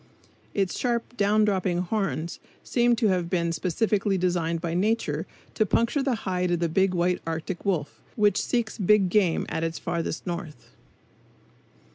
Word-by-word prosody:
Its 195 -3 0
sharp, 240 -1 -1
down 210 +1 +3
dropping 190 -3 0
horns 180 -3 -2 0.2
seem 240 -1 +2
to 225 -3 +2
have 180 -3 0
been 170 -2 0
specially 195 +4 0
designed 175 -2 0
by 165 0 -3
nature 215 +6 0 0.3
to 215 - +2
puncture 235 - +1
the 270 -3 +1
hide 180 -1 0
of 175 -1 +1
the 170 - +1
big 185 +3 +2
white 180 +1 +1
arctic 165 +2 -4
wolf, 170 -7 -1
which 210 -4 +3
seeks 235 -3 -1
big 200 -1 +4
game 190 -5 +2
at 160 - -2
its 165 0 -2
farthest 170 -1 -3
north. 170 -6 -6
185 Hz, 155 wpm, -26 LUFS, 170-210 Hz, 0.3 s, big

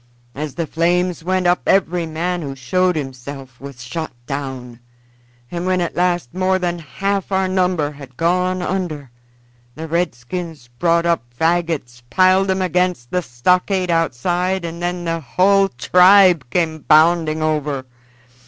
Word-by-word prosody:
As 150 0 -5
the 170 - -2
flames 175 +2 0
went 185 +1 0
up 175 0 +3
every 175 -3 +2
man 175 +3 -2
who 140 -3 -5
showed 180 +8 +1
himself 135 -2 -7
was 135 -3 -9
shot 160 +6 -5
down, 130 -3 -6 0.7
and 175 +1 -3
when 185 0 +1
at 175 - -2
last 175 -6 0
more 185 +1 +1
than 175 -2 -2
half 195 +7 -3
our 190 0 +1
number 180 -5 0
had 140 -3 -13
gone 180 +2 +1
under 170 -8 -3 0.6
the 160 +1 -6
redskins 160 -2 -4
brought 170 -1 +2
up 170 -1 +2 0.2
fagots, 160 -7 -1
piled 185 +1 +3
'em 190 0 +1
against 180 -7 -1
the 180 - +1
stockade 180 +7 +1
outside, 175 +4 0
and 170 +1 -6
then 175 0 -3
the 165 0 -1
hull 195 +7 +3
tribe 180 +1 +5
came 160 +2 0
bounding 155 0 +3
over. 150 -3 -1
170 Hz, 145 wpm, -19 LUFS, 145-180 Hz, 0.7 s, tribe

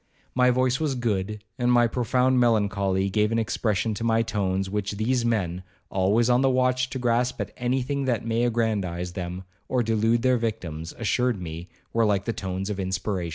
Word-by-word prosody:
My 125 0 +4
voice 130 +1 +2
was 150 -4 0
good, 105 -3 -2 0.2
and 125 0 +2
my 120 -1 +5
profound 125 +2 +2
melancholy 100 -5 +2
gave 105 +1 +2
an 115 - +1
expression 110 -2 0
to 105 - -5
my 115 0 +2
tones, 95 -4 -1
which 105 +1 -2
these 115 +4 0
men, 95 -7 0 0.3
always 100 +5 +2
on 125 +1 +4
the 135 - +4
watch 130 0 +2
to 130 - -4
grasp 125 0 0
at - - -4
any 125 +1 0
thing 140 +1 -2
that 120 -4 0
may 115 +1 +1
aggrandize 100 -7 -1
them, 90 0 -5 0.2
or 125 -2 +1
delude 115 +1 +1
their 130 -1 +4
victims, 85 -8 -4
assured 120 0 0
me 85 0 -7 0.2
were 115 - +3
like 100 -2 +1
the 115 - -1
tones 95 -1 -4
of 100 - -4
inspiration. 95 -1 -2
115 Hz, 190 wpm, -25 LUFS, 95-125 Hz, 0.3 s, my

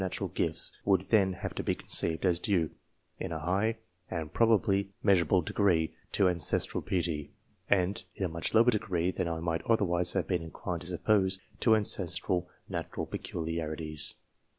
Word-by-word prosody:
Natural 95 -1 -3
gifts - - -2
would 95 -2 +3
then 100 -4 +4
have 90 - -5
to - - -3
be - - 0
conceived 80 +2 0
as 85 -2 +3
due, 90 -5 +1 0.5
in - - -4
a 80 - -2
high 95 +8 0 0.3
and 80 -3 -4
probably 100 -4 +3
measurable 90 -3 +4
degree, 85 -3 +1 0.2
to 100 - +4
ancestral 85 -2 +2
piety, 85 -5 -2 0.4
and, 95 0 +2
in 100 - -2
a - - +1
much 85 +5 -2
lower 115 +2 +6
degree 95 -5 0
than 90 - -2
I 80 -1 -3
might 85 -1 -1
otherwise 90 -5 +2
have - - 0
been 90 -3 0
inclined 85 +1 -5
to 85 - -7
suppose, 95 +1 +2 0.2
to 110 -2 +5
ancestral 90 -3 0 0.2
natural - - -4
peculiarities. 80 -2 -2
90 Hz, 160 wpm, -30 LUFS, 85-100 Hz, 0.5 s, lower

